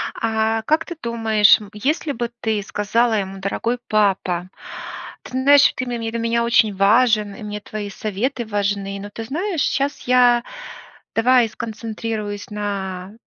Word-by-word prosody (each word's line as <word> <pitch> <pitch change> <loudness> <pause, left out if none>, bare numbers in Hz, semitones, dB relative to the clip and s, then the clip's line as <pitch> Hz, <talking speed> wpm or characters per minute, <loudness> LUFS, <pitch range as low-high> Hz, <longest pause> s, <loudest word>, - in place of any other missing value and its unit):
А 220 0 0
как 310 +7 +1
ты 345 - -7
думаешь, 220 -3 +4
м, 205 -1 -11
если 290 +7 -1
бы 235 -1 -3
ты 220 -2 0
сказала 225 +3 +1
ему: 195 -2 -2
"Дорогой 230 +5 -2
папа, 190 -4 +1 0.7
ты - - -12
знаешь, 280 +2 +5
что - - +4
ты 255 - -3
ме 240 -1 -3
ты 225 0 -3
для 235 - -2
меня 235 0 +1
очень 225 -3 +3
важен, 210 0 +3
и 220 - -10
мне 210 0 -5
твои 205 0 -6
советы 220 +5 -3
важны, 200 -1 -2
но 205 +1 -8
ты 225 +2 -7
знаешь, 335 - -2
щас 280 +1 0
я 245 -1 +5 0.7
давай 240 0 +4
сконцентрируюсь 220 -2 -5
на 195 -2 -4
220 Hz, 160 wpm, -21 LUFS, 205-240 Hz, 0.7 s, знаешь